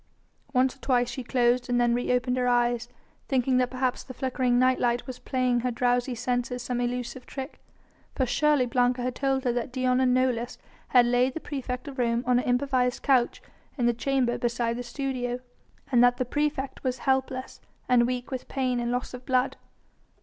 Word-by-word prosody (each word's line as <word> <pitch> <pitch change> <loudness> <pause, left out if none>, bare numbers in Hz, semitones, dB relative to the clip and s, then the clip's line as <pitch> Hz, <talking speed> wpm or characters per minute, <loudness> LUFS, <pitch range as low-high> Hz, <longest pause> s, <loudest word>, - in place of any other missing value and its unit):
Once 260 0 +2
or - - -25
twice 245 -3 +1
she 255 +1 -5
closed 245 0 +1
and 245 0 +2
then 240 -1 +3
reopened 250 0 +1
her 250 -1 0
eyes, 240 -1 +1 0.4
thinking 260 -1 +2
that 250 -1 +2
perhaps 255 0 -1
the 255 - -10
flickering 255 -2 0
night 255 +1 +3
light 240 0 +1
was 255 -1 -7
playing 255 -2 0
her 250 +1 -1
drowsy 245 +1 0
senses 245 +1 -2
some 245 0 -2
elusive 245 +1 -3
trick. 270 +1 -7 0.6
For 260 - +1
surely 295 +1 +2
Blanca 245 +1 +1
had 250 0 -1
told 270 0 0
her 245 -3 +1
that 245 +1 -3
Dion 255 0 +1
and 255 -1 +3
Nolus 250 -1 0 0.3
had 245 -2 +5
laid 245 +2 +2
the - - -2
praefect 265 -3 -5
of 275 -2 -7
Rome 235 0 +1
on 250 0 +3
an - - -3
improvised 250 0 +1
couch 255 -3 +2 0.3
in 245 - +1
the 240 - +3
chamber 250 0 0
beside 235 -1 -1
the - - -3
studio, 245 0 -3 0.5
and 245 -2 +5
that 245 0 +4
the 255 - -1
praefect 285 0 -2
was 255 -1 -1
helpless 265 0 -1 0.3
and 240 -1 +4
weak 250 +1 -3
with 260 -1 -5
pain 255 -2 -1
and 240 0 -1
loss 245 +1 -2
of 250 0 -8
blood. 255 +1 +1
250 Hz, 195 wpm, -27 LUFS, 245-260 Hz, 0.6 s, had